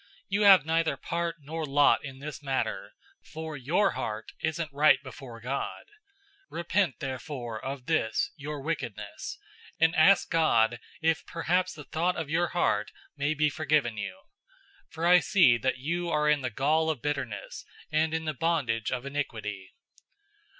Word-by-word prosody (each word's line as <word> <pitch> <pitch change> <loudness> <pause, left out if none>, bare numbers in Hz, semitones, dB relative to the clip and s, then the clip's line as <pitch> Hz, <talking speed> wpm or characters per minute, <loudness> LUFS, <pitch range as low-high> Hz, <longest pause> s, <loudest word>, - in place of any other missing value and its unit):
008:021 - - -29 0.2
You 200 +2 +1
have 195 -6 +8
neither 165 0 +1
part 170 0 -2
nor 160 +3 -5
lot 145 0 +4
in 135 -2 -8
this 145 +1 -7
matter, 135 -2 -2 0.3
for 160 -1 -7
your 165 +10 +2
heart 110 0 -4
isn't 160 -1 -2
right 150 +2 +6
before 130 -3 -10
God. 130 +4 -4
008:022 - - -30 0.6
Repent 170 - 0
therefore 130 -4 -5
of 135 -1 -5
this, 155 -8 0
your 150 0 -6
wickedness, 115 -9 -5 0.4
and 165 +1 +4
ask 180 +5 +5
God 120 -8 +3 0.2
if 160 -1 +2
perhaps 180 +2 0
the 150 - -9
thought 170 +5 0
of 155 -2 -4
your 170 +2 +2
heart 105 -13 0 0.3
may 145 +2 0
be 150 +1 +3
forgiven 150 -7 +1
you. 100 -3 -5 0.7
008:023 - - -46
For 165 +1 -3
I 180 +1 +7
see 165 - +5
that 130 +4 0
you 170 +6 -2
are 150 -2 +1
in 150 -1 +3
the 130 - -2
gall 155 +7 +1
of 145 -7 -3
bitterness 135 -9 -4 0.3
and 155 +1 +1
in 160 0 -2
the 155 - -1
bondage 135 -8 0
of 125 0 -3
iniquity." 110 -9 -5
150 Hz, 165 wpm, -28 LUFS, 130-165 Hz, 0.7 s, have